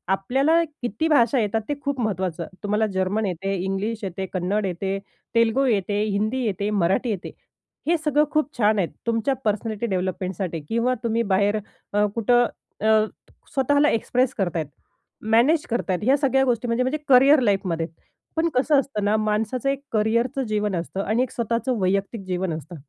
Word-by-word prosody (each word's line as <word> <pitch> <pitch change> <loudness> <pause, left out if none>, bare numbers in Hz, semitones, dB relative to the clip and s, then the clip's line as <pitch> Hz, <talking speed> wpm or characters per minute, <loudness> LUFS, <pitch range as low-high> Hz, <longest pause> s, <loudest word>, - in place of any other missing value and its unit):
आपल्याला 270 +12 +2 0.2
किती 240 +6 -1
भाषा 260 -4 +4
येतात 220 0 0
ते - - +1
खूप 280 -2 -2
महत्त्वाचं. 185 -6 -2 0.2
तुम्हाला 210 +2 +1
जर्मन 195 +4 0
येते, 195 +1 -2
इंग्लिश 210 +4 -2
येते, 190 0 -3
कन्नड 195 +3 0
येते, 190 +2 -2 0.4
तेलुगू 230 +4 +3
येते, 205 -3 +1
हिंदी 215 +5 -1
येते, 200 -1 -1
मराठी 190 +8 +1
येते. 200 -5 -4 0.6
हे 340 +1 +3
सगळं 300 -1 +2
खूप 305 -1 -1
छान 215 -2 +3
आहेत 175 - 0 0.2
तुमच्या 230 +4 +1
पर्सनॅलिटी 215 +1 -1
डेव्हलपमेंटसाठी. 185 -3 -2
किंवा 235 +2 +1
तुम्ही 230 0 +1
बाहेर 205 +2 +2 0.4
अ, 205 0 +3
कुठं 240 +2 +4 0.4
अ, 220 0 +5 0.5
स्वतःला 285 +2 +3
एक्सप्रेस 250 +3 +1
करतायेत 175 -6 -1 0.6
मॅनेज 275 +8 +4
करतायेत. 200 -6 -1
ह्या 265 +5 +4
सगळ्या 270 -1 +2
गोष्टी 245 -1 0
म्हणजे 230 +2 +1
म्हणजे 260 +4 0
करिअर 275 +3 +7
लाईफमध्ये. 190 -7 0 0.5
पण 330 +1 +2
कसं 275 +3 +3
असतं 250 -6 -3
ना 205 +1 +3
माणसाचं 215 +4 0
एक 275 0 -1
करिअरचं 235 +5 +1
जीवन 210 -2 0
असतं 175 +3 -3
आणि 220 +5 +1
एक 255 - -5
स्वतःचं 235 +2 -1
वैयक्तिक 195 +3 0
जीवन 180 -1 -1
असतं. 160 +2 -7
220 Hz, 160 wpm, -23 LUFS, 195-255 Hz, 0.6 s, करिअर